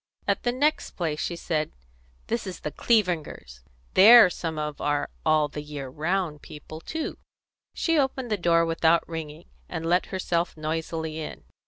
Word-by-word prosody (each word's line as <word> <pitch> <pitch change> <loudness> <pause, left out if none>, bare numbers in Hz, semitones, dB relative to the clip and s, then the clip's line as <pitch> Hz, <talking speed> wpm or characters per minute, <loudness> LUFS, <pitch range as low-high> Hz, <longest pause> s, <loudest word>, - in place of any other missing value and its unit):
At - - +1
the 245 - +1
next 290 +5 0
place 160 -4 -2
she 170 - -2
said: 155 -3 -2 0.5
"This 230 -3 -2
is 185 - -7
the 150 - -4
Clevingers'. 175 - 0 0.3
They're 215 0 +9
some 165 -3 -4
of 150 -1 -4
our 145 0 0
all 155 -1 +3
the 150 +1 -6
year 145 -3 -7
round 160 +1 -2
people 155 +1 -10
too." 320 - -5 0.6
She 330 -2 +2
opened 265 -3 -1
the - - +3
door 170 -3 +3
without 165 0 +2
ringing, 155 - -7 0.2
and 160 - -4
let 175 +2 +2
herself 175 -3 -1
noisily 160 0 -3
in. 155 - -7
165 Hz, 160 wpm, -26 LUFS, 155-190 Hz, 0.6 s, They're